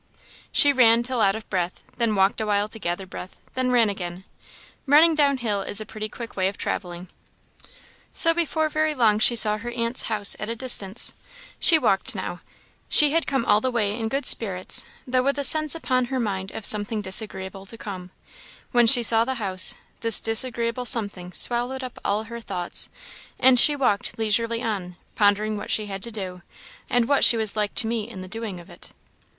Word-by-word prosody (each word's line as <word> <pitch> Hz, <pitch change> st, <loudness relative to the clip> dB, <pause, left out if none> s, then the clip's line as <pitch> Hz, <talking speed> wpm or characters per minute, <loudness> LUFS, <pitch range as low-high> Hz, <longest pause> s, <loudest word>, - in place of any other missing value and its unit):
She 285 Hz, 0 st, +5 dB
ran 235 Hz, -2 st, +4 dB
till 250 Hz, -1 st, -2 dB
out 195 Hz, 0 st, +2 dB
of 220 Hz, -1 st, -9 dB
breath; 180 Hz, -2 st, -4 dB
then 230 Hz, -3 st, 0 dB
walked 195 Hz, +2 st, +1 dB
awhile 205 Hz, -1 st, -1 dB
to 220 Hz, -, -7 dB
gather 175 Hz, 0 st, -4 dB
breath; 185 Hz, 0 st, -10 dB, 0.2 s
then 255 Hz, 0 st, -1 dB
ran 240 Hz, -3 st, +3 dB
again. 180 Hz, -2 st, -6 dB, 0.6 s
Running 310 Hz, +4 st, +5 dB
down 285 Hz, -3 st, +1 dB
hill 215 Hz, -5 st, -3 dB
is 200 Hz, -, -1 dB
a 215 Hz, -, -6 dB
pretty 215 Hz, 0 st, -7 dB
quick 235 Hz, +1 st, -10 dB
way 185 Hz, -1 st, 0 dB
of 195 Hz, -, -5 dB
travelling; 180 Hz, -1 st, -5 dB, 1.0 s
so 330 Hz, -, +3 dB
before 320 Hz, -2 st, -1 dB
very 310 Hz, 0 st, -1 dB
long 220 Hz, -5 st, +2 dB
she 235 Hz, +2 st, +4 dB
saw 215 Hz, -2 st, +4 dB
her 235 Hz, +3 st, -7 dB
aunt's 235 Hz, +1 st, -1 dB
house 205 Hz, -2 st, +3 dB
at 210 Hz, -, -5 dB
a 230 Hz, -, -3 dB
distance. 225 Hz, -4 st, -1 dB, 0.5 s
She 330 Hz, -, +6 dB
walked 230 Hz, -2 st, -1 dB
now. 175 Hz, -2 st, -6 dB, 0.5 s
She 295 Hz, -1 st, +5 dB
had 330 Hz, +1 st, 0 dB
come 270 Hz, -4 st, -1 dB
all 210 Hz, +1 st, +3 dB
the 260 Hz, -, -1 dB
way 215 Hz, -4 st, -1 dB
in 225 Hz, -1 st, -4 dB
good 275 Hz, +4 st, -3 dB
spirits, 185 Hz, -5 st, 0 dB, 0.2 s
though 255 Hz, 0 st, 0 dB
with 275 Hz, +2 st, -1 dB
a 285 Hz, -, -2 dB
sense 310 Hz, +2 st, +5 dB
upon 255 Hz, -6 st, -1 dB
her 260 Hz, +1 st, -4 dB
mind 195 Hz, -4 st, -4 dB
of 205 Hz, -, -8 dB
something 210 Hz, +1 st, +2 dB
disagreeable 190 Hz, -1 st, +1 dB
to 230 Hz, -, -5 dB
come; 185 Hz, -4 st, -8 dB, 0.6 s
when 240 Hz, -2 st, +3 dB
she 240 Hz, +1 st, +8 dB
saw 225 Hz, 0 st, +5 dB
the 260 Hz, +2 st, -3 dB
house, 190 Hz, -5 st, +3 dB, 0.2 s
this 230 Hz, -2 st, +6 dB
disagreeable 230 Hz, +1 st, +1 dB
something 200 Hz, -8 st, 0 dB
swallowed 245 Hz, +6 st, -2 dB
up 255 Hz, -, -9 dB
all 210 Hz, +2 st, -1 dB
her 235 Hz, +1 st, -9 dB
thoughts, 180 Hz, -5 st, -5 dB, 0.5 s
and 255 Hz, -1 st, +5 dB
she 295 Hz, +4 st, +4 dB
walked 245 Hz, -8 st, -2 dB
leisurely 230 Hz, +1 st, 0 dB
on, 190 Hz, -5 st, -4 dB, 0.2 s
pondering 210 Hz, +1 st, +1 dB
what -, -, -8 dB
she 215 Hz, -, 0 dB
had 195 Hz, -1 st, -7 dB
to 235 Hz, -, -4 dB
do, 185 Hz, -4 st, -7 dB, 0.5 s
and 245 Hz, -1 st, +1 dB
what 280 Hz, 0 st, +1 dB
she 235 Hz, -, +7 dB
was 220 Hz, -2 st, -1 dB
like 210 Hz, -2 st, -2 dB
to -, -, +3 dB
meet 225 Hz, -1 st, -3 dB
in 190 Hz, -6 st, -10 dB
the 185 Hz, -, -9 dB
doing 215 Hz, -2 st, -7 dB
of 175 Hz, -, -15 dB
it. -, -, -13 dB
225 Hz, 200 wpm, -23 LUFS, 200-250 Hz, 1.0 s, she